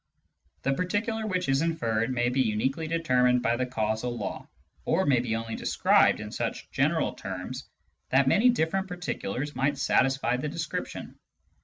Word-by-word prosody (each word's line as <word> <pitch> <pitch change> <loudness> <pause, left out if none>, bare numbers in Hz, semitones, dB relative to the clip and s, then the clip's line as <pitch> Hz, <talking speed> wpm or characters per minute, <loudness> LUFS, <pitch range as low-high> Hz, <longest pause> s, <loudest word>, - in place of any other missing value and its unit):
The 135 - +2
particular 210 - -1
which 185 -6 -1
is 135 +1 +2
inferred 115 -9 0
may 120 -1 +1
be 130 +2 +1
uniquely 130 +7 0
determined 125 -7 +2
by 115 +1 +2
the 125 +1 -1
causal 110 0 -2
law, - - -5 0.3
or 180 +4 +1
may 135 -4 +4
be 115 -2 -1
only 115 0 -4
described - - +3
in - - -7
such - - -4
general - - +1
terms 95 +8 -6 0.4
that 130 +1 +3
many 220 - +5
different 190 -3 0
particulars 150 - -4
might 140 +1 0
satisfy 135 -2 +2
the 145 +4 -3
description. 165 0 -5
135 Hz, 155 wpm, -27 LUFS, 120-165 Hz, 0.4 s, many